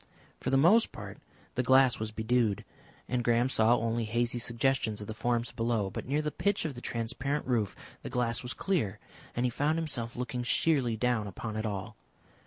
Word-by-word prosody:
For - - -2
the 135 - +4
most 180 +11 +5
part - - -9 0.3
the 125 - +1
glass 130 0 +5
was 110 0 -2
bedewed, 110 -1 0 0.4
and 125 -1 0
Graham 120 +2 +3
saw 115 -1 +4
only 115 0 0
hazy 120 +2 0
suggestions 115 -2 0
of 105 - -6
the 110 - -5
forms 120 +1 0
below, 115 -4 0
but - - -6
near 145 +3 +1
the 150 - -1
pitch 200 +6 0
of 155 - -2
the 120 - -9
transparent 130 +6 -2
roof 115 -6 0 0.3
the - - -6
glass 115 -2 0
was 125 - -4
clear, 140 - 0 0.4
and 120 - +1
he 125 - +1
found 150 +6 +1
himself 125 -8 -1
looking 125 0 -3
sheerly 125 -2 +2
down 120 -2 +1
upon 105 +3 -5
it 110 0 -1
all. 100 -3 -5
120 Hz, 190 wpm, -30 LUFS, 110-130 Hz, 0.4 s, most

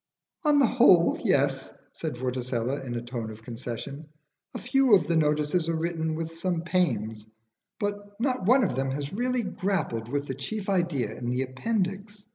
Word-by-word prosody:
"On 295 -1 +5
the 280 - +6
whole 190 -9 +5
yes," 135 -1 +1 0.2
said 155 -5 -4
Vorticella, 125 +1 -2
in 120 -2 -4
a 120 - -3
tone 120 -2 -5
of 110 0 -10
concession. 125 +5 -6 0.5
"A - - -1
few 260 -3 +4
of 185 - +2
the 170 - +1
notices 150 +2 +2
are 165 - +1
written 160 -1 -1
with 165 0 -4
some 175 -2 0
pains, 110 - 0 0.5
but 205 0 -4
not 250 -6 0
one 255 +3 +6
of 195 - 0
them 135 +1 0
has 140 +3 -3
really 250 +2 0
grappled 170 - -2
with 145 +2 -1
the 135 - -3
chief 195 - -5
idea 175 -9 0
in 120 - -4
the 125 +2 0
appendix. 200 - -3
160 Hz, 175 wpm, -27 LUFS, 130-200 Hz, 0.5 s, the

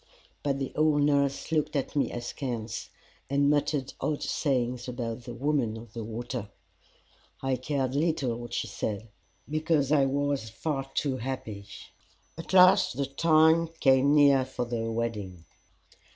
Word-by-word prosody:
But 140 -1 0
the 135 -1 -3
old 150 -1 +3
nurse 140 0 +1
looked 155 -1 0
at 140 0 -2
me 145 - +1
askance, 120 -2 -5 0.4
and 140 +1 +3
muttered 145 -2 0
odd 150 -1 -1
sayings 125 -4 -1
about 120 -1 -4
the 120 - -6
Woman 130 -4 0
of 115 -1 -12
the 115 - -5
Water. 115 0 -5 0.9
I 135 -1 +1
cared 130 0 -2
little 145 -5 0
what 120 0 -8
she - - -1
said, 105 0 -4 0.5
for 155 -3 +2
I 140 -2 +4
was 140 -4 -1
far 135 +3 -3
too 135 -3 0
happy. 110 -5 -5 0.7
At 165 - -8
last 185 -7 +6
the 140 - 0
time 160 +3 +4
came 135 +2 +4
near 140 -2 +6
for 130 -1 -4
the 115 -1 -3
wedding. 105 -7 -4
135 Hz, 145 wpm, -28 LUFS, 120-145 Hz, 0.9 s, last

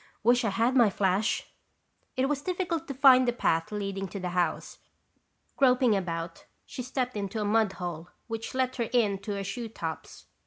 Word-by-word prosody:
"Wish 245 +2 +4
I 220 - +1
had 230 +6 +1
my 235 -5 +6
flash." 195 +2 +1 0.7
It 260 +1 +2
was 285 -1 -1
difficult 345 -1 -2
to 275 - -4
find 255 -1 +6
the - - +4
path 165 -8 0
leading 195 -2 -3
to 195 +2 -7
the 180 -1 -3
house. 175 -2 -2 0.8
Groping 250 -4 +4
about, 165 -3 -4 0.2
she - - -7
stepped 250 -1 -3
into 205 +1 -3
a 210 - -1
mud 215 -1 +2
hole 175 -2 -6 0.2
which 225 +1 -5
let 260 0 0
her 235 -3 -1
in 210 -5 +2
to 205 +1 -5
her 200 0 -3
shoetops. 200 -6 -6
220 Hz, 180 wpm, -28 LUFS, 195-255 Hz, 0.8 s, my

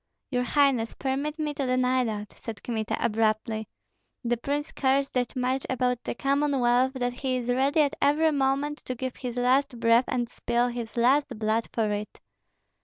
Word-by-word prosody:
"Your 250 -2 +1
highness, 250 -3 +2
permit 280 +3 -2
me 305 -2 -2
to 280 -2 -2
deny 255 0 +2
that," 210 -2 -4
said 225 -2 -7
Kmita, 220 -3 -2
abruptly. 220 0 0 0.6
"The 240 0 +1
prince 285 +5 -3
cares 275 0 +1
that 250 -1 -1
much 255 +1 0
about 250 -1 0
the - - -4
Commonwealth 265 -2 +2
that 245 -2 -2
he 255 0 -2
is 245 -1 -4
ready 275 +5 +3
at 290 0 +2
every 310 +3 +3
moment 280 +1 0
to 255 - -3
give 255 +1 -5
his 250 -2 -5
last 250 0 +2
breath 230 +2 +4
and 245 -2 -1
spill 240 +1 0
his 240 -1 -6
last 255 +1 +3
blood 220 +1 0
for 220 -2 0
it." 210 0 -4
250 Hz, 175 wpm, -27 LUFS, 235-275 Hz, 0.6 s, breath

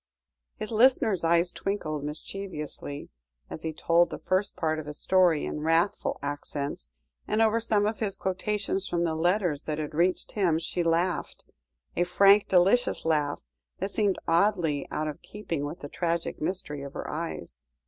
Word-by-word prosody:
His 215 0 -6
listener's 220 -5 +4
eyes 170 +1 +3
twinkled 155 -7 -3
mischievously 150 -2 -6 0.4
as - - -6
he 160 - -3
told 170 +2 +3
the - - -5
first 185 +3 +1
part 155 -1 0
of 150 - -7
his 150 0 -6
story 180 -5 +3
in - - -4
wrathful 165 +5 +1
accents, 145 - -4 0.4
and 215 - 0
over 225 0 +4
some 215 -2 +1
of 215 +1 -1
his 205 -3 -1
quotations 195 +1 -1
from 170 -1 0
the 165 -2 0
letters 175 -2 +1
that 155 -1 -2
had 155 0 -4
reached 175 +4 +1
him 180 -6 +2
she 170 +2 -2
laughed 170 +2 0 0.5
a 175 - +2
frank, 195 +3 +5
delicious 195 +7 +3
laugh 150 -3 +1 0.4
that 195 +2 -3
seemed 205 -3 +1
oddly 165 -4 +2
out 155 0 -2
of 150 +2 -6
keeping 170 -8 -4
with 155 +5 -6
the 145 - -5
tragic 170 +2 -2
mystery 155 -4 -3
of 140 0 -8
her - - -5
eyes. 150 - -5
170 Hz, 165 wpm, -28 LUFS, 155-195 Hz, 0.5 s, frank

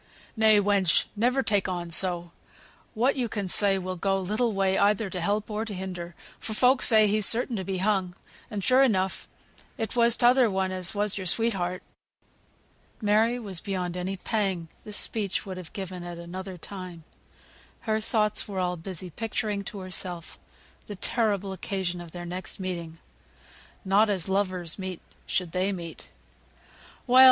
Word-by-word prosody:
"Nay, 220 -2 +5
wench, 200 -3 +3
never 250 +5 +2
take 205 -5 +1
on 175 -2 -4
so. 175 -1 +1 0.6
What 245 +5 +2
yo 250 -3 0
can 205 -3 -3
say 195 +1 +5
will 185 0 -4
go 195 +2 +1
little 215 +5 0
way 195 -1 +1
either 205 0 +2
to 180 - -3
help 205 +4 0
or 210 +1 -1
to 220 -3 -6
hinder, 180 -2 -6 0.2
for 220 - -4
folk 255 +3 +4
say 220 -2 +6
he's 210 0 +2
certain 240 +1 +4
to 190 - -3
be 190 +1 -3
hung; 190 -2 0 0.3
and 205 -2 -4
sure 255 +4 +5
enough 190 -8 +1 0.5
it 225 0 -3
was 235 -1 +4
t'other 245 0 +5
one 190 -1 0
as 185 +1 0
was 205 0 0
your 185 - -3
sweetheart." 185 -3 0 1.1
But - - -17
Mary 220 +4 +3
was 195 -8 -5
beyond 180 -3 -3
any 185 +2 -3
pang 190 -5 -1 0.2
this 210 -1 -1
speech 205 -3 -1
would 190 -2 -6
have 180 -3 -9
given 185 -2 -6
at 175 -1 -7
another 185 +2 -7
time. 180 -2 -8 0.8
Her 220 -1 0
thoughts 215 -1 0
were 200 -2 -6
all 180 -1 0
busy 180 +1 -7
picturing 210 0 -2
to 200 - -6
herself 180 -2 -4 0.5
the 205 - -6
terrible 200 -2 0
occasion 185 -2 -3
of 170 - -9
their 175 +1 -7
next 180 +3 -6
meeting 170 -3 -5 0.9
not 200 +3 +4
as 190 -4 0
lovers 185 -3 -1
meet 185 -2 -5 0.3
should 180 -3 -1
they 185 +3 0
meet! 170 -4 -7 1.0
"Well!" 255 0 +5
195 Hz, 165 wpm, -27 LUFS, 180-215 Hz, 1.1 s, say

